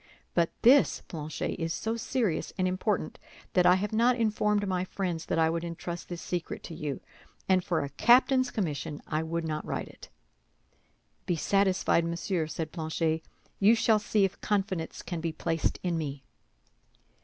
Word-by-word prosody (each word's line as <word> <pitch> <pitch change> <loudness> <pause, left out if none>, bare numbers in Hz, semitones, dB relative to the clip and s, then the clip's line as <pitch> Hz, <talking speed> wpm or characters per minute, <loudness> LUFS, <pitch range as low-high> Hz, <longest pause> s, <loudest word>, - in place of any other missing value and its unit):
But 170 -1 +3
this, 265 +4 +5
Planchet, 155 +2 -4
is 165 0 -1
so 225 +1 -2
serious 230 -6 -1
and 185 -1 +2
important 185 -1 -1 0.3
that 180 -1 +5
I 180 - +7
have 205 +3 -2
not 235 +3 +4
informed 210 -3 +1
my 185 -1 0
friends 180 -3 -3
that - - 0
I 160 -1 +4
would 165 +1 -1
entrust 170 0 -6
this 175 -2 -6
secret 175 -1 -4
to - - -7
you; 150 -4 -4 0.5
and 185 -1 +3
for 170 -2 0
a 140 - -4
captain's 255 - +4
commission 150 -7 -3
I 155 0 -1
would 165 +1 -2
not 155 -1 -2
write - - -4
it." - - -14 1.2
"Be 175 - +1
satisfied, 190 -1 +2
monsieur," 170 0 -1
said 155 0 -4
Planchet, 160 -1 -1 0.4
"you 210 +4 +6
shall 225 -1 +3
see 210 -1 +2
if 195 - -5
confidence 195 -5 -1
can 170 -2 -4
be 165 0 -1
placed 165 0 -1
in 175 -2 0
me." 140 -3 -5
175 Hz, 165 wpm, -29 LUFS, 160-205 Hz, 1.2 s, I